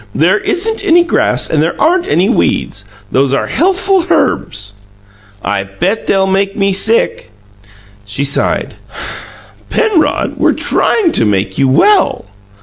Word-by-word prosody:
"There 185 +7 +2
isn't 440 +5 0
any 345 +1 +4
grass 345 - +1
and - - 0
there - - -2
aren't 355 +2 +1
any 185 +3 +1
weeds; 245 - -1 0.3
those 135 +1 +1
are - - -1
healthful 375 +1 +1
herbs." 100 - -1 0.7
"I 100 -1 -1
bet 175 - -3
they'll 195 -1 +2
make 195 +1 -1
me 195 -1 +1
sick." 225 - +2 0.7
She 105 +7 -3
sighed. 140 0 0 1.0
"Penrod, 340 -10 0
we're - - +2
trying 400 -8 +1
to - - +2
make 95 -2 -1
you 135 - +3
well." 390 - +2
195 Hz, 135 wpm, -12 LUFS, -, 1.0 s, any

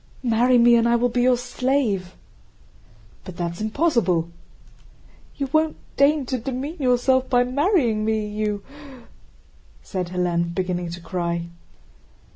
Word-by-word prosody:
"Marry 245 +1 +3
me, 240 0 +6
and 230 0 +2
I 235 - +4
will 245 +1 +2
be 245 +1 0
your 250 0 +4
slave!" 245 -6 -1 1.1
"But 185 - -10
that's 170 +1 -4
impossible." 215 - +1 1.1
"You 275 - -2
won't 315 0 +2 0.2
deign 280 0 +3
to 255 0 -2
demean 270 +7 -5
yourself 260 0 +2
by 245 -1 +4
marrying 255 - +1
me, 220 -1 0
you..." 210 -1 -3 1.2
said 185 -3 -4
Hélène, 175 -1 -1
beginning 180 -2 -2
to 170 +1 -8
cry. 170 -1 -3
235 Hz, 125 wpm, -23 LUFS, 185-255 Hz, 1.2 s, me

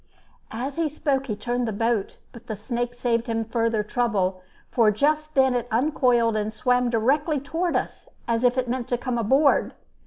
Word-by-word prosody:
As 260 +6 -5
he 330 -2 +1
spoke 275 -2 -1
he 215 - -2
turned 240 +3 -2
the - - -1
boat: 225 0 -1 0.2
but 235 0 -14
the 220 - -3
snake 240 +3 -3
saved 235 -1 0
him 225 -1 -1
further 225 -1 0
trouble, 205 -5 -1 0.3
for 230 -3 +4
just 305 +7 0
then 265 -1 +4
it 245 -1 -1
uncoiled 240 -2 +2
and 215 0 -1
swam 250 +2 +1
directly 280 +7 +1
toward 330 +6 -2
us, - - -3 0.2
as 230 0 0
if 250 +1 +3
it 255 -1 0
meant 245 0 -2
to 245 - 0
come 245 -1 -2
aboard. 270 +6 +3
240 Hz, 185 wpm, -24 LUFS, 225-265 Hz, 0.3 s, for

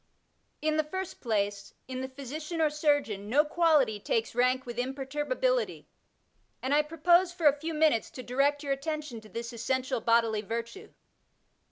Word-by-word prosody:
In 310 0 +1
the 310 - +3
first 375 +4 -6
place, 205 -3 -1
in 255 0 -4
the 260 - -4
physician 295 +5 -6
or 310 -2 +3
surgeon 290 -10 0
no 290 +6 +4
quality 300 -9 +3
takes 225 +2 -1
rank 255 +2 +2
with 240 -1 -5
imperturbability, 295 - -1 0.7
and 260 +2 -1
I 295 - +5
propose 345 +4 +3
for 350 -2 -5
a 290 - +8
few 320 +1 -4
minutes 305 -7 +3
to 255 - -6
direct 280 +4 +1
your 280 -1 0
attention 295 -4 -4
to 215 - -15
this 235 +1 -6
essential 260 +1 -1
bodily 230 -2 +3
virtue. 230 +2 -5
275 Hz, 160 wpm, -29 LUFS, 235-305 Hz, 0.7 s, a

